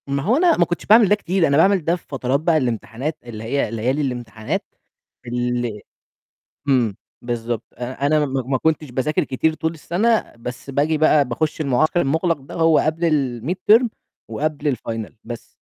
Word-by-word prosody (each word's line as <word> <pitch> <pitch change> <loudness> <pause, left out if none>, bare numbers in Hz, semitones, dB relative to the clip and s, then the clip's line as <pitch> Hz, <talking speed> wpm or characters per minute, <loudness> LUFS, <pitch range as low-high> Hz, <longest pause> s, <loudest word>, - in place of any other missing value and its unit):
ما 140 0 -1
هو 220 +8 +3
أنا 345 +1 +4
ما 175 - +4
كنتش 175 - -4
باعمل 215 -1 +6
ده 210 - +5
كتير، 185 -3 +1
أنا 140 0 +2
باعمل 190 0 +4
ده 170 - +2
في 175 - -14
فترات 135 0 -1
بقى 160 +1 +2
الإمتحانات، 125 +3 -2
اللي 115 -3 -8
هي 120 -1 -1
ليالي 125 +6 0
الإمتحانات 120 -5 -3 0.6
ال 120 -2 -2 0.9
إمم، 120 -7 +2 0.3
بالضبط 120 -1 -3
آآ، 125 +3 -3
أنا 150 0 +3
ما 135 -1 -2
ما 130 0 0
كنتش 155 -2 0
باذاكر 130 +5 0
كتير 155 +4 0
طول 160 +1 -2
السَنة 210 +8 0
بس 125 +3 -7
بآجي 150 +3 +1
بقى 155 -1 +4
باخُش 150 +6 -2
المُعسكر 155 +4 +2
المُغلَق 160 +3 +1
ده 135 - -11
هو 165 -1 +4
قبل 165 +2 +1 0.3
الmid 165 +9 -1 0.2
term 240 +1 +4 0.4
وقبل 145 +3 -1
الfinal 115 -3 -5
بس. 115 0 -7
140 Hz, 175 wpm, -21 LUFS, 125-160 Hz, 0.9 s, باعمل